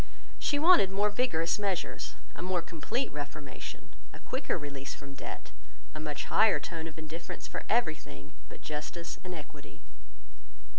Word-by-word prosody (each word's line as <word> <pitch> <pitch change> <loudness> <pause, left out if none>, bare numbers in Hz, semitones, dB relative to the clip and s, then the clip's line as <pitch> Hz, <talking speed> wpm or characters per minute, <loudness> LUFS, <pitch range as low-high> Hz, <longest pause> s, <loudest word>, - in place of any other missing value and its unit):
She 290 - +3
wanted 320 - +8
more 205 +2 +3
vigorous 200 -7 +2
measures, 195 -3 -1 0.2
a - - -6
more 180 -1 +1
complete 170 - -1
reformation, 145 -1 -6 0.2
a - - -9
quicker - - 0
release 140 -2 -4
from 140 -1 -9
debt, 135 - -6 0.4
a 155 - -5
much 150 -2 -2
higher 220 -1 +6
tone 165 -2 -4
of 160 - -9
indifference 160 +1 -5
for - - -4
everything 155 - +1 0.2
but - - -10
justice 155 +3 -4
and 180 -1 -4
equity. 150 -2 -10
165 Hz, 145 wpm, -32 LUFS, 150-195 Hz, 0.4 s, wanted